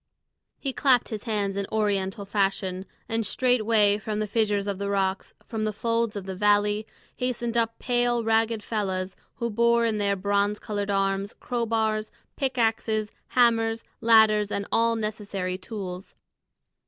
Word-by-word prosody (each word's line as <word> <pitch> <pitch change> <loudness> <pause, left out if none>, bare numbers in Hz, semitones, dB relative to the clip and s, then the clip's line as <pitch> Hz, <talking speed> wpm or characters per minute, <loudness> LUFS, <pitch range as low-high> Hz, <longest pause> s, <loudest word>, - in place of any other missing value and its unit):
He 270 -2 -3
clapped 255 -3 +3
his 215 -2 -5
hands 205 -3 -1
in 200 -1 -2
Oriental 200 -1 0
fashion, 195 -2 -1 0.2
and 225 0 -1
straightway 215 -3 +2
from 215 0 -3
the 215 - 0
fissures 210 -1 0
of 200 -2 -3
the 200 0 -2
rocks, 195 -1 -1
from 220 -2 -3
the 215 - 0
folds 230 +1 -1
of 200 -2 -5
the 190 - -4
valley, 205 +2 +2 0.3
hastened 240 -2 -2
up 230 -1 +1
pale, 240 -1 +1
ragged 225 -1 +1
fellahs, 190 -4 -2 0.2
who 235 -1 -2
bore 235 +1 +3
in 220 -2 0
their 200 -1 +1
bronze 200 +2 +1
coloured 205 -2 -4
arms 195 0 0
crow 240 -2 -2
bars, 220 -1 0 0.2
pick 265 -2 -2
axes, 220 -2 0 0.3
hammers, 225 -2 +3 0.2
ladders, 220 -2 +5
and 200 - -2
all 230 0 +3
necessary 200 -4 -3
tools. 185 -2 -7
215 Hz, 155 wpm, -26 LUFS, 200-230 Hz, 0.3 s, ladders